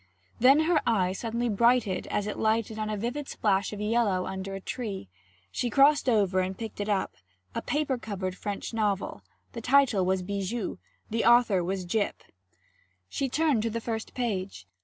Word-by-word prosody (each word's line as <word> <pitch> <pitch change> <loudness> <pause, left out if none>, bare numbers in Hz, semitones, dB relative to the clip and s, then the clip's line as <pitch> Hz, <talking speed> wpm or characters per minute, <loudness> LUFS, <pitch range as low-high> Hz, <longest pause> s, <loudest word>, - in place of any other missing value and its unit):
Then 270 +5 +6
her 315 -1 +3
eye 190 -6 +2
suddenly 230 +4 -2
brightened 235 -2 +2
as 205 - -1
it 210 - -4
lighted 220 0 0
on 215 0 -2
a 215 - -2
vivid 245 +7 -3
splash 195 +1 +1
of 210 - -6
yellow 210 -4 +1
under 190 +1 -5
a - - -5
tree. 200 - -5 0.4
She 245 - -1
crossed 280 +3 +4
over 200 -5 +3
and 185 0 -2
picked 225 -2 -6
it 205 - -3
up 200 -2 0 0.4
a - - -2
paper 290 -4 -1
covered 190 -5 -4
French 205 +4 -5
novel; 205 -3 -1 0.3
the 230 - -7
title 250 -5 +4
was 185 0 +1
Bijou, 200 +3 -3 0.3
the 230 +1 0
author 235 -6 +5
was 185 +1 -2
Gyp. 205 +3 0 0.9
She 275 - -2
turned 295 -4 +2
to 230 - -1
the 230 +1 -3
first 225 -1 -5
page. 195 - -3
215 Hz, 175 wpm, -28 LUFS, 195-240 Hz, 0.9 s, Then